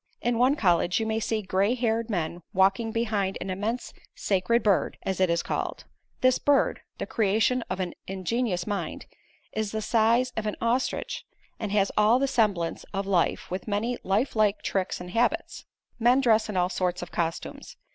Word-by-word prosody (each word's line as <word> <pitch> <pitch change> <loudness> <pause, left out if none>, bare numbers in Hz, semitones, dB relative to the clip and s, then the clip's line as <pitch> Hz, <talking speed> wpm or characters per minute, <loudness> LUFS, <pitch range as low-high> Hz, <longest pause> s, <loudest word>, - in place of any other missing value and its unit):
In 235 -1 0
one 255 +3 +4
college 180 - +2
you 225 - -1
may 220 0 0
see 220 -1 -1
gray 195 +5 +1
haired 230 -1 0
men 175 -3 -2
walking 195 +4 +3
behind 215 -4 -1
an 190 - -4
immense 215 +6 -3 0.2
Sacred 205 +5 +1
Bird, 200 -3 +2
as 190 -1 -2
it 185 - +4
is 170 0 +1
called. - - -3 0.4
This 255 0 +4
Bird 285 -1 +2 0.2
the - - -3
creation 225 +4 +1
of - - -3
an 180 -2 -2
ingenious 190 0 -1
mind 205 -2 -4 0.5
is 215 -1 -2
the 220 - -2
size 235 +3 +2
of 220 -1 -2
an 210 - -2
ostrich 240 +3 -1 0.4
and 210 -3 -3
has 200 -1 +2
all 215 +3 +5
the 275 +1 +1
semblance 205 -10 0
of 195 0 -1
life, 185 -3 0
with 185 +3 -4
many 215 +4 0
lifelike 215 0 +1
tricks 190 -1 -1
and 180 0 -8
habits. 245 - 0 0.3
Men 245 +3 +5
dress 225 -4 +3
in 205 - -2
all 180 0 +2
sorts 180 -1 -1
of 175 - -9
costumes. 165 -1 -4
210 Hz, 175 wpm, -27 LUFS, 190-235 Hz, 0.5 s, all